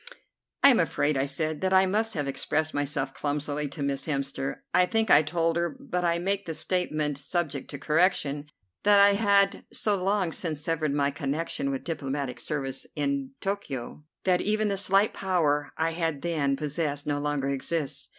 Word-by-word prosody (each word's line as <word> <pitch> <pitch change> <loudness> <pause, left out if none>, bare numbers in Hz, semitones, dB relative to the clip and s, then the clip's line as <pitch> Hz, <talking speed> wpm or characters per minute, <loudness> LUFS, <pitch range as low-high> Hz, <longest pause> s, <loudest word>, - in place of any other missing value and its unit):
"I 280 - +10
am 245 - +3
afraid," 150 -3 +1
I 135 0 +1
said, 155 +2 -1
"that 190 0 +1
I 190 0 +6
must 215 +3 0
have 145 -3 -2
expressed 155 +3 -1
myself 145 -1 -1
clumsily 145 0 -2
to 140 +1 -6
Miss 140 +1 -2
Hemster. 140 -2 -2
I 180 - +4
think 225 0 +1
I 145 - +8
told 165 +2 0
her, 170 +9 -1
but 205 -11 -3
I 170 -1 +2
make 195 +3 -1
the 160 - -4
statement 155 -4 -1
subject 145 -3 -2
to 145 - -6
correction, 150 -2 +1 0.3
that 205 0 +5
I 200 0 +7
had 200 -1 +3
so 210 - +1
long 195 -3 +1
since 160 -3 -2
severed 155 -2 -1
my 140 -1 +2
connection 140 0 -2
with 135 -1 -3
diplomatic 140 -5 -3
service 135 -3 -3
in 140 -2 -1
Tokio 150 -9 -4 0.2
that 180 -1 +2
even 215 +1 +1
the 200 - 0
slight 195 +2 +2
power 150 -6 0
I 165 +1 0 0.3
then 145 -3 0
possessed 150 -1 -2
no 145 -1 -1
longer 145 -2 -1
exists. 140 +2 -2
155 Hz, 175 wpm, -27 LUFS, 140-185 Hz, 0.3 s, I